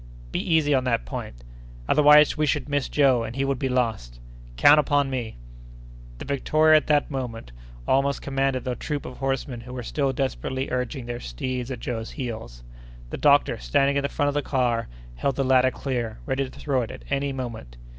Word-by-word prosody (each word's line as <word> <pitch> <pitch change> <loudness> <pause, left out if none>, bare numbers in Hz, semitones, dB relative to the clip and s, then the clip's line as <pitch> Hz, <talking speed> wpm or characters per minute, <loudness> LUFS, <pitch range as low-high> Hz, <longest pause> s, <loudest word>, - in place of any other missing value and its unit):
"Be - - -1
easy 160 -4 +2
on 130 -2 +2
that 115 - 0
point." - - -7 0.4
"Otherwise, 150 0 +6
we 150 -1 0
should 145 -1 0
miss 145 -2 -1
Joe, 135 -5 +3
and 115 +1 -6
he 135 0 0
would 135 -2 -1
be 135 - -1
lost." 110 - -2 0.4
"Count 145 - +7
upon 145 -1 +1
me!" 120 - -4 0.8
The - - -8
Victoria 155 +3 +4
at 155 - -1
that 150 0 +2
moment 120 - -5 0.4
almost 140 +1 +2
commanded 135 -2 -1
the 125 - -2
troop 145 +2 -4
of 125 - -8
horsemen 135 -2 -3
who 125 +2 -10
were 125 - -5
still 140 +3 -1
desperately 130 0 -3
urging 125 0 -3
their 120 0 -5
steeds 125 - -4
at 125 -3 -6
Joe's 115 -2 -4
heels. 110 - -7 0.5
The - - -4
doctor, - - +3
standing 135 - +1
in 140 - +2
the 140 - -2
front 145 -2 0
of - - -2
the 145 - 0
car, 125 -5 0 0.3
held 135 - 0
the 135 - 0
ladder 130 0 +4
clear, 120 -5 -4
ready 135 -1 -1
to - - -14
throw 135 -3 0
it 115 - -4
at - - -9
any 140 0 0
moment. 115 - -7
130 Hz, 195 wpm, -24 LUFS, 120-140 Hz, 0.8 s, Count